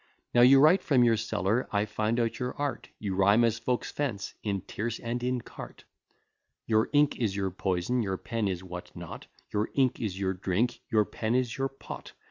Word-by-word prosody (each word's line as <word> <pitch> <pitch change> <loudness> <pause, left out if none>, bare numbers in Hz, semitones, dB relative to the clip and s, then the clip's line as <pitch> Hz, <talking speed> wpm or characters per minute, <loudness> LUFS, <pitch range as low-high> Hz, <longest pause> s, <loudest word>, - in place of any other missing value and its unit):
Now 120 - +5
you 135 +2 +8
write 155 +7 +6
from 130 -4 +3
your 115 -1 +5
cellar, 110 +1 0
I 105 0 +1
find 110 +2 -1
out 115 -1 -1
your 125 0 -3
art, 145 -4 -3
You 100 -3 -3
rhyme 100 +4 +4
as 115 0 +2
folks 125 +1 -1
fence, 120 -10 -3
in 100 -3 -2
tierce 110 +4 -4
and 120 +1 -3
in 125 0 -1
cart: - - -11 0.8
Your 110 0 +2
ink 145 0 +3
is 105 -5 -1
your 95 -1 -1
poison, 95 +6 0
your 95 -3 -2
pen 115 0 -2
is 95 -2 -3
what 90 -1 -8
not; - - -8 0.3
Your 105 +1 0
ink 130 -3 +2
is 100 -4 -3
your 95 -1 0
drink, 100 +6 -1
your 110 -2 +3
pen 110 +3 -2
is 125 -2 0
your 135 0 -1
pot. 135 - -10
115 Hz, 200 wpm, -29 LUFS, 100-125 Hz, 0.8 s, you